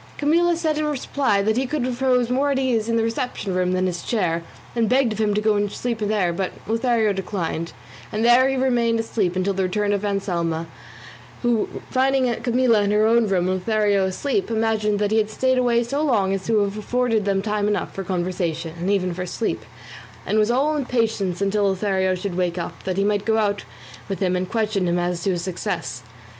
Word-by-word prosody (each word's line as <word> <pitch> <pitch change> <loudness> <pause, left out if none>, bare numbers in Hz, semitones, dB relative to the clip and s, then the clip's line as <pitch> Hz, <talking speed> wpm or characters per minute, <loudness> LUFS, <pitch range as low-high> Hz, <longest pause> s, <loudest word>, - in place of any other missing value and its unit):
Camilla 335 +4 +3
in 310 -1 +1
reply 270 -7 0
said 220 +1 +1
he 260 +1 0
could 290 -2 -1
repose 250 -1 +1
more 275 +3 +2
at 275 - +1
his 265 - 0
ease 230 -3 0
in 230 - +1
the 225 - +2
reception 230 -4 -2
room 180 0 +1
than 185 0 +1
in - - +2
his 175 -2 -2
chair, 175 -7 0 0.3
and 230 -2 +1
begged 255 -3 +3
of 215 - -7
him 210 -2 +1
to 210 - +1
go 215 0 +2
in 205 - +2
and 205 -1 -2
sleep 235 -2 -3
there; 205 -5 0
but 185 +2 -2
Lothario 225 -1 +1
declined, 180 -4 -3 0.4
and 215 +2 0
there 250 +2 +6
he 270 - 0
remained 240 -3 +1
asleep 210 -5 -1
until 185 +2 0
the 195 - -1
return 205 +2 0
of 200 0 -1
Anselmo, 175 -5 -1 0.8
who 240 -3 +1 0.2
finding 260 -1 +2
Camilla 240 -3 +3
in 200 - +1
her 210 +1 +3
own 230 0 +4
room, 185 -2 +1
and 185 0 0
Lothario 205 -1 +2
asleep, 285 - -1
imagined 220 -2 +1
that 205 0 0
he 220 - +3
had 215 -1 0
stayed 260 +3 +1
away 240 -1 +2
so 275 +5 -2
long 210 -10 +2
as 195 -1 -4
to 220 -2 +3
have 200 +1 -2
afforded 225 -1 0
them 195 -1 +1
time 210 -1 0
enough 210 -1 -1
for 195 - -4
conversation 175 -3 -2
and 180 +3 -2
even 185 -3 +1
for 180 +1 -4
sleep, 195 - -2 0.6
and 215 +3 +1
was 215 +1 +2
all 280 +6 +2
impatience 225 -9 -1
until 200 +1 +1
Lothario 190 -1 0
should 185 +1 -4
wake 180 -1 -1
up, 170 - -5
that 185 -1 -2
he 195 - +2
might 205 0 +1
go 220 0 +1
out 205 -2 0 0.4
with 195 - -2
him 185 -2 +1
and 180 0 -2
question 215 -5 0
him 175 0 +1
as 175 0 -1
to 195 - 0
his 175 -2 -1
success. 180 - -4
210 Hz, 220 wpm, -22 LUFS, 190-240 Hz, 0.8 s, there